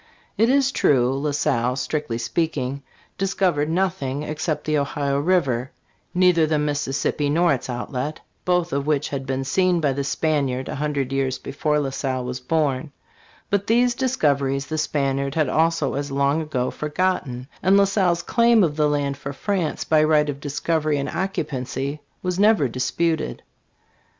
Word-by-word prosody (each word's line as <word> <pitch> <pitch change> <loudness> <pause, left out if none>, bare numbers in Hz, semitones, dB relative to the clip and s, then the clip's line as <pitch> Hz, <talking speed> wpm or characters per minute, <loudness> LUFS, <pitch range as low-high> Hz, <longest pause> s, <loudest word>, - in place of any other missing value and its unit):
It 225 +2 +3
is 270 0 +3
true, 130 - +3
La 150 +2 -1
Salle, 125 -4 0
strictly 130 -2 -2
speaking, 135 +2 -2 0.4
discovered 185 -6 +1
nothing 165 -6 -1
except 155 +1 -2
the 155 -1 +1
Ohio 140 0 -1
river 140 -7 +1 0.5
neither 180 -3 +4
the 155 0 +1
Mississippi 145 0 -1
nor 170 +1 +3
its 130 - -4
outlet, 125 +4 -4 0.2
both 180 -1 +1
of 140 +1 -1
which 150 -2 +1
had 135 -1 -4
been 135 0 -1
seen 180 +6 +2
by 145 -4 +1
the 140 +1 -2
Spaniard 140 -3 0
a - - -3
hundred 140 -2 -2
years 135 -1 0
before 150 +1 -1
La 140 -2 -2
Salle 130 -2 -2
was 125 0 -4
born; 145 0 -1 0.6
but 200 0 +1
these 240 +2 +3
discoveries 140 - 0
the 155 - -4
Spaniard 140 -2 -1
had 155 -2 +2
also 160 -3 +1
as 145 +1 -3
long 140 +3 +1
ago 130 -5 -2
forgotten, 150 -6 -2
and 190 +2 +4
La 200 - +6
Salle's 185 -4 +1
claim 235 +1 +4
of 155 -3 0
the 150 -1 +3
land 140 -1 -1
for 140 0 -6
France 180 +2 -2
by 155 -1 +3
right 150 -1 +3
of 140 - -9
discovery 150 +1 -1
and 140 0 -2
occupancy 140 -5 -3 0.2
was 180 0 -1
never 205 -8 +4
disputed. 130 - -1
150 Hz, 160 wpm, -23 LUFS, 135-170 Hz, 0.6 s, La